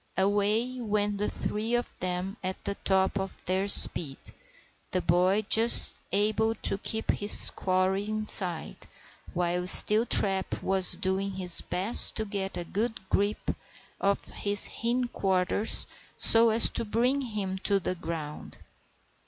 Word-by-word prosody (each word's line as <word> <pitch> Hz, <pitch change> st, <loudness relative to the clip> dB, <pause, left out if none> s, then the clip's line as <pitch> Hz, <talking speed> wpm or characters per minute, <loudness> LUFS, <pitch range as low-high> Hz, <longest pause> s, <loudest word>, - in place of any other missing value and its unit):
Away 205 Hz, +6 st, -3 dB
went 205 Hz, -2 st, -4 dB
the 210 Hz, -, -4 dB
three 220 Hz, +3 st, -6 dB
of 240 Hz, -, -6 dB
them 185 Hz, +2 st, -6 dB
at 185 Hz, 0 st, -8 dB
the 200 Hz, -, -6 dB
top 190 Hz, 0 st, -3 dB
of 190 Hz, 0 st, -8 dB
their 190 Hz, +2 st, -3 dB
speed, 155 Hz, -7 st, +3 dB, 0.7 s
the 185 Hz, -, -4 dB
boy 185 Hz, +4 st, -1 dB
just 230 Hz, +2 st, +8 dB
able 215 Hz, +2 st, -2 dB
to 195 Hz, -, 0 dB
keep 220 Hz, +2 st, -4 dB
his 205 Hz, 0 st, +3 dB
quarry 190 Hz, +1 st, -3 dB
in 215 Hz, 0 st, -6 dB
sight, 175 Hz, -, -3 dB, 0.5 s
while 180 Hz, +1 st, -4 dB
Steeltrap 200 Hz, -2 st, +3 dB
was 190 Hz, -1 st, +3 dB
doing 190 Hz, +1 st, -5 dB
his 180 Hz, -2 st, +6 dB
best 195 Hz, +6 st, +3 dB
to 220 Hz, -, -5 dB
get 195 Hz, -2 st, -7 dB
a 175 Hz, -, -6 dB
good 220 Hz, +6 st, -6 dB
grip 205 Hz, +1 st, -4 dB, 0.4 s
of 200 Hz, 0 st, -3 dB
his 205 Hz, 0 st, +4 dB
hindquarters 220 Hz, -5 st, -4 dB, 0.3 s
so 230 Hz, 0 st, +3 dB
as 225 Hz, +1 st, +2 dB
to -, -, -6 dB
bring 245 Hz, +6 st, -3 dB
him 205 Hz, -6 st, -7 dB
to 200 Hz, 0 st, -2 dB
the 185 Hz, -, -6 dB
ground. 165 Hz, -4 st, -10 dB
200 Hz, 135 wpm, -25 LUFS, 185-215 Hz, 0.7 s, just